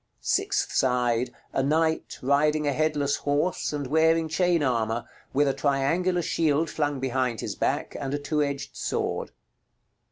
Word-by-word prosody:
Sixth - - 0
side. 125 -2 +1 0.2
A - - +1
knight, 160 +3 0
riding 150 +3 +2
a 145 - +1
headless 150 -1 +1
horse, 145 +5 0
and 145 -2 -3
wearing 160 +3 +3
chain 175 -1 +2
armor, 115 -3 0 0.3
with 145 +2 +2
a 135 - +2
triangular 165 +7 +1
shield 160 0 +1
flung 145 -3 -1
behind 130 -2 -1
his - - -3
back, - - -1
and 135 -1 -3
a 145 - 0
two 150 +1 -1
edged 140 -1 -3
sword. - - -2
145 Hz, 150 wpm, -26 LUFS, 135-160 Hz, 0.3 s, wearing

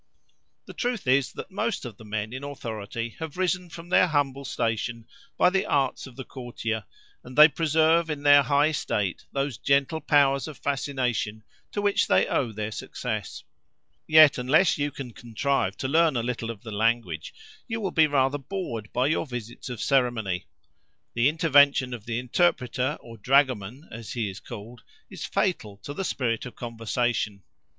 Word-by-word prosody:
The - - -10
truth 245 -7 -2
is, 130 0 +3
that - - -8
most 215 - -2
of 115 -4 -8
the - - -13
men 110 +1 -4
in 130 +2 -6
authority 115 -4 -5
have 160 0 -6
risen 180 -1 0
from 165 +1 -10
their 180 - +5
humble 140 -3 0
station 115 -1 -2 0.3
by 180 - +5
the 190 0 +2
arts 135 -1 0
of 130 - -14
the 130 - -6
courtier, 120 -4 -5 0.4
and 125 - -11
they 150 +1 +11
preserve 160 +2 +2
in 145 -2 -4
their 145 0 +8
high 140 +2 +3
estate 105 - -2
those 135 -4 -2
gentle 140 +3 +1
powers 140 -3 +3
of 155 - -8
fascination 125 -7 -2 0.3
to 205 - -3
which 205 -1 +2
they 95 +1 +4
owe 125 -5 0
their 105 0 -4
success. - - -5 0.6
Yet 155 -4 +7
unless 155 +8 +4
you 145 0 -1
can 135 -3 -8
contrive 120 -3 -1
to 130 - -2
learn 160 +1 +3
a 115 - -1
little 120 -1 -3
of 115 -1 -7
the 110 - -7
language, 105 -6 0 0.4
you 225 -2 -3
will 195 -4 -2
be 160 -2 +5
rather 140 0 +1
bored 130 - -5
by 125 +1 +1
your 155 +2 0
visits 120 0 -7
of 120 -3 -4
ceremony; 115 -9 +1 0.7
the 120 +4 +3
intervention 145 -5 +4
of 115 -3 -8
the 115 -1 -2
interpreter, 125 0 +1
or 115 -1 -12
dragoman 130 - +1
as 115 +2 -7
he 115 -6 -2
is 95 - -10
called, 115 +1 -10 0.3
is - - -6
fatal 110 - -1
to 145 - -6
the 195 - -3
spirit 120 -9 -1
of 120 - -11
conversation. 115 -3 -2
130 Hz, 175 wpm, -26 LUFS, 115-150 Hz, 0.7 s, they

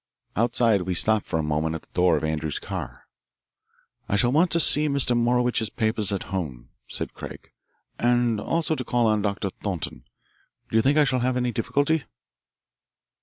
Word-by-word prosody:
Outside 115 -2 +2
we 90 0 -2
stopped 110 +3 +1
for 80 - -1
a 80 - -1
moment 75 +1 -1
at 80 - -7
the - - -25
door 90 -3 +3
of 75 - -4
Andrews's 80 -1 -2
car. - - -6 1.0
"I - - +1
shall 120 +4 +3
want 165 +6 +3
to 170 - +2
see 150 -1 +5
Mr. 140 -3 +1
Morowitch's 120 -1 +1
papers 110 -2 0
at 100 - -2
home," 70 -11 -4 0.2
said - - -2
Craig, - - -10 0.5
"and 120 -2 +2
also 165 +4 0
to 130 - -3
call 120 -1 +1
on 110 -1 +2
Doctor 100 -1 -2
Thornton. 90 -13 -5 0.7
Do - - -2
you 110 - +6
think 140 +5 +2
I 150 - +6
shall 130 -2 +1
have 125 +1 0
any 125 -1 0
difficulty?" 145 +6 0
110 Hz, 175 wpm, -25 LUFS, 90-125 Hz, 1.0 s, you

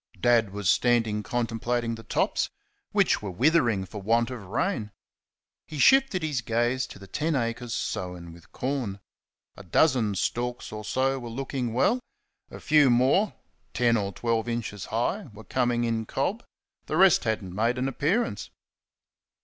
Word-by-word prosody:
Dad 115 +1 +3
was 100 -1 -4
standing 115 -1 +2
contemplating 120 +1 -1
the 115 - -7
tops, - - 0 0.4
which - - +2
were 105 - -4
withering 120 - +2
for 105 +2 -8
want 115 +4 +1
of 120 -4 -7
rain. 115 - -1 0.8
He 155 - -7
shifted 265 - +4
his 150 -5 -1
gaze 120 +2 0
to - - -11
the 100 - -12
ten 150 - -1
acres 120 -1 -2
sown 90 -2 -4
with 85 -1 -17
corn. 125 -7 -3 0.6
A - - -11
dozen 110 - +2
stalks 120 +6 -2
or 105 0 -6
so 130 +5 0
were 120 -2 -7
looking 130 0 -3
well; 130 - +2 0.5
a - - -9
few 150 -3 +4
more, 130 - +3 0.4
ten 120 0 +3
or 100 -3 -1
twelve 115 +3 -1
inches 110 -5 -4
high, 135 - -1
were 105 +2 -11
coming 120 -1 0
in 115 -2 -1
cob; 195 - -2 0.4
the 155 - -1
rest 185 -7 +5
had 110 -2 0
n't 90 -1 -8
made 115 +5 +1
an 130 +1 0
appearance. 165 - -1
120 Hz, 155 wpm, -27 LUFS, 110-135 Hz, 0.8 s, rest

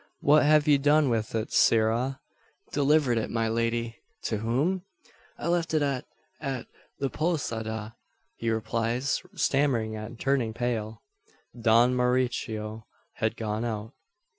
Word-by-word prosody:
"What 150 +2 +6
have 150 +1 +4
you 145 -2 +5
done 145 -1 +4
with 115 -1 -1
it, 110 0 -2
sirrah?" 115 +4 +3 0.5
"Delivered 140 -4 +3
it, 110 - -3
my 115 -1 0
lady." 115 +1 -1 0.3
"To 110 - -1
whom?" 135 - 0 0.6
"I - - -4
left 170 -2 +1
it 155 - +3
at 135 -3 -1 0.3
at 135 -5 -3 0.3
the 140 - -1
posada," 110 -9 -2 0.4
he 115 - -2
replies, 115 +4 -1
stammering 125 -6 +1
and 110 +2 -7
turning 130 -5 0
pale. 115 -3 -3 0.5
"Don 115 +2 +4
Mauricio 120 -3 -1 0.3
had 110 -1 -1
gone 110 0 -2
out." 110 0 -4
120 Hz, 130 wpm, -27 LUFS, 110-140 Hz, 0.6 s, What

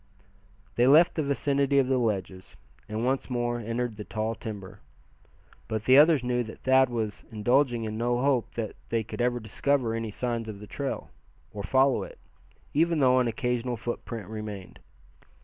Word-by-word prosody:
They 120 +1 +4
left 155 +5 +6
the 160 - -1
vicinity 140 -1 +1
of 135 - +5
the 130 -1 +2
ledges, 95 -5 -3 0.3
and 110 +2 -2
once 135 +1 0
more 120 -1 -1
entered 115 0 -3
the 105 - -5
tall 110 +1 -2
timber. 105 -4 -8 0.9
But 110 -1 -3
the 130 +2 +7
others 150 -3 +5
knew 125 0 0
that 110 - -11
Thad 130 0 +5
was 110 -4 -3
indulging 120 +2 +2
in 110 0 -4
no 120 +1 +1
hope 130 -2 0
that 115 -2 -4
they 115 -1 0
could 110 - -8 0.2
discover 125 +2 0
any 115 -1 -3
signs 115 +1 -3
of 100 -2 -7
the 105 - -9
trail, 140 +6 -5 0.4
or 105 - -5
follow 130 +5 +3
it, - - -8 0.6
even 165 +2 +2
though 130 -2 +5
an 125 - +2
occasional 125 +1 -1
footprint 115 -2 -5
remained. 105 -3 -7
120 Hz, 165 wpm, -27 LUFS, 110-130 Hz, 0.9 s, the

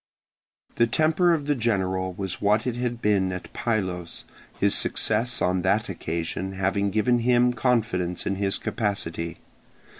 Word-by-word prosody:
The 115 - +4
temper 160 +7 +3
of 155 -4 0
the 145 - +2
general 95 -7 0
was 95 0 -5
what 105 +2 +2
it 125 -2 -1
had 120 -1 -3
been 100 -3 +2
at 90 0 -7
Pylos, 95 -7 -2 0.3
his - - +3
success 115 +3 0
on 90 0 +1
that 100 +4 +1
occasion 85 +2 -3
having 95 +1 0
given 115 +4 +2
him 125 +1 +3
confidence 105 -9 0
in 95 - -1
his 100 0 +1
capacity. 85 -6 -3
100 Hz, 145 wpm, -25 LUFS, 95-120 Hz, 0.3 s, The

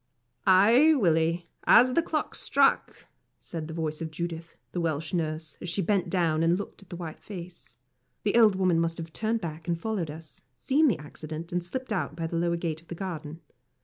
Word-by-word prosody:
"Ay, 230 +12 +6
Willie, 170 - +2 0.2
as 250 +1 +6
the 335 - +4
clock 310 -2 -2
struck!" - - +1 0.3
said 160 -3 -6
the 160 - -7
voice 155 -1 -3
of 160 - -3
Judith, 165 +1 -5 0.2
the 175 - -2
Welsh 160 -1 -2
nurse, 155 -2 -2
as 175 - -4
she 175 - -2
bent 195 +1 +1
down 165 -4 +1
and 165 +2 +3
looked 200 - -7
at 195 - -18
the - - -6
white 170 -3 -7
face. 175 - -9 0.5
The 205 - +1
old 220 -4 +6
woman 185 -3 +2
must 165 0 0
have 165 -1 -7
turned 225 +1 -1
back 160 -1 -6
and 170 -1 0
followed 200 -5 -2
us, 155 -2 -9 0.2
seen 300 +4 +3
the 225 - +2
accident, 155 +2 -8
and 175 0 -1
slipped 255 +6 -4
out 155 -6 -2
by 165 0 -3
the 165 - -4
lower 170 0 +1
gate 165 -2 -3
of 170 - -26
the 170 - -6
garden. 165 -4 -6
170 Hz, 205 wpm, -28 LUFS, 160-195 Hz, 0.5 s, Ay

